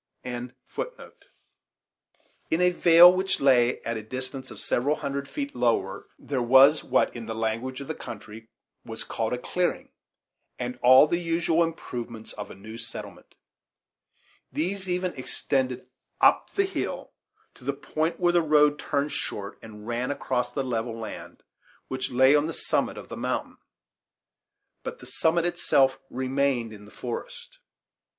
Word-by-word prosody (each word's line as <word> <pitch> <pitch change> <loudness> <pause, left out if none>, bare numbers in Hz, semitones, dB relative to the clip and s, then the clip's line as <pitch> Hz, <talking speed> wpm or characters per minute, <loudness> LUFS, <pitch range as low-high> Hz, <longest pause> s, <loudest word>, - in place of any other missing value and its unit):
In 125 0 -6 1.9
the 180 +2 +3
vale, 175 0 +8
which 190 +1 0
lay 125 -3 +4
at 115 -1 -2
a - - -4
distance 130 +4 -5
of - - -9
several 140 +5 +1
hundred 140 -1 -4
feet 140 0 -4
lower, 115 -5 0
there 135 -3 -3
was 135 +5 +6
what, - - +1
in 115 -2 -7
the 110 - -4
language 115 +4 -2
of 140 - -7
the 160 - -2
country, 110 -3 -9 0.4
was 115 -1 -7
called 110 -1 -2
a 125 - 0
clearing, 180 +8 -2 0.7
and 125 0 -4
all 130 +3 +8
the 170 +3 0
usual 170 0 +2
improvements 120 -8 -6
of 105 -1 -7
a - - -10
new 110 +4 -10
settlement; - - -9 1.2
these 190 +4 -2
even 180 0 -1
extended 130 -1 -2 0.3
up - - +4
the 395 - +3
hill 385 - -4 0.4
to - - -18
the - - 0
point 160 +2 -2
where 175 -1 +3
the 175 - +5
road 150 -1 +4
turned 145 0 -1
short 100 -1 -5
and 105 -1 -11
ran 120 +2 -2
across 125 -3 -1
the 135 - -2
level 115 -2 -2
land, 110 -2 -8 0.5
which 130 0 -3
lay 130 +3 +5
on 150 +1 +3
the 165 - -4
summit - - -1
of - - -9
the - - -6
mountain; - - -3 1.2
but 485 - -6
the - - -13
summit 165 +1 +1
itself 140 -6 +2
remained 130 -3 0
in 105 -1 -12
the 105 - -15
forest. 480 - -7
130 Hz, 150 wpm, -26 LUFS, 120-160 Hz, 1.9 s, vale